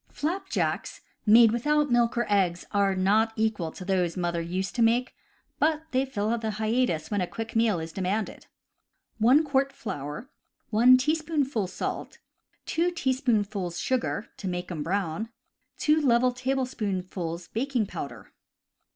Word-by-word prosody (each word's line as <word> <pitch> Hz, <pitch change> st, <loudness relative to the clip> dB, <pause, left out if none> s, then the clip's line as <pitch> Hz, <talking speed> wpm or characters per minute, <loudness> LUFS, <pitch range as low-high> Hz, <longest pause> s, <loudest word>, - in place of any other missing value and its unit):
Flapjacks 340 Hz, +6 st, -2 dB, 0.3 s
made 225 Hz, +1 st, +8 dB
without 295 Hz, +4 st, +1 dB
milk 240 Hz, 0 st, +2 dB
or 240 Hz, -, +2 dB
eggs 185 Hz, -4 st, +1 dB
are 200 Hz, -2 st, +2 dB
not 210 Hz, +4 st, +2 dB
equal 215 Hz, -7 st, -1 dB
to 185 Hz, -, -9 dB
those 180 Hz, -3 st, 0 dB
that -, -, -4 dB
mother 170 Hz, -1 st, -1 dB
used 185 Hz, +3 st, -3 dB
to 240 Hz, -, -1 dB
make, 235 Hz, +3 st, +2 dB, 0.5 s
but 310 Hz, 0 st, +2 dB
they 260 Hz, +1 st, +2 dB
fill 220 Hz, -3 st, -1 dB
the 220 Hz, -1 st, -2 dB
hiatus 215 Hz, -8 st, 0 dB
when 205 Hz, -2 st, +1 dB
a 180 Hz, -, -1 dB
quick 225 Hz, +3 st, -6 dB
meal 225 Hz, -5 st, +3 dB
is 160 Hz, 0 st, -6 dB
demanded. 195 Hz, +4 st, -3 dB, 0.7 s
1 255 Hz, +8 st, +5 dB
quart 275 Hz, -2 st, +1 dB
flour, 150 Hz, -, -6 dB, 0.4 s
1 245 Hz, +4 st, +7 dB
teaspoonful 295 Hz, -, 0 dB
salt, -, -, -5 dB, 0.5 s
2 340 Hz, +2 st, +1 dB
teaspoonfuls 220 Hz, -, -1 dB
sugar 250 Hz, -4 st, -1 dB
(to 195 Hz, -, -5 dB
make 180 Hz, 0 st, -4 dB
'em 160 Hz, -4 st, -4 dB
brown), 195 Hz, +4 st, -2 dB, 0.5 s
2 310 Hz, +1 st, +3 dB
level 250 Hz, -2 st, +4 dB
tablespoonfuls 200 Hz, -10 st, -3 dB
baking 245 Hz, -1 st, -1 dB
powder. -, -, -7 dB
220 Hz, 140 wpm, -27 LUFS, 185-255 Hz, 0.7 s, made